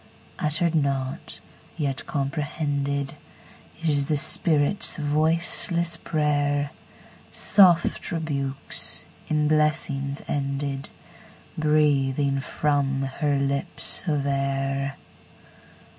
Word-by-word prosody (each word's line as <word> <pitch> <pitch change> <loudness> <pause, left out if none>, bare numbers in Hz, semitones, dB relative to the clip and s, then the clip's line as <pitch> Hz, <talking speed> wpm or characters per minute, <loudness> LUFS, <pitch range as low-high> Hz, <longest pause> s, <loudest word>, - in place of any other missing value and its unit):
Uttered 155 +2 +1
not, 140 -4 -2 0.4
yet 140 -4 -2
comprehended, 140 -1 -3 0.7
Is 145 -3 +3
the 150 - 0
spirit's 150 +6 +4
voiceless 165 +3 +2
prayer, 145 -2 -1 0.6
Soft 180 -4 +4
rebukes, 140 -5 -2 0.2
in 150 -1 0
blessings 145 -2 0
ended, 140 -1 -3 0.7
Breathing 145 -3 +1
from 140 -1 -1
her 140 +2 -1
lips 140 +6 -1
of 145 -3 -1
air. 135 0 -2
145 Hz, 75 wpm, -24 LUFS, 140-155 Hz, 0.7 s, spirit's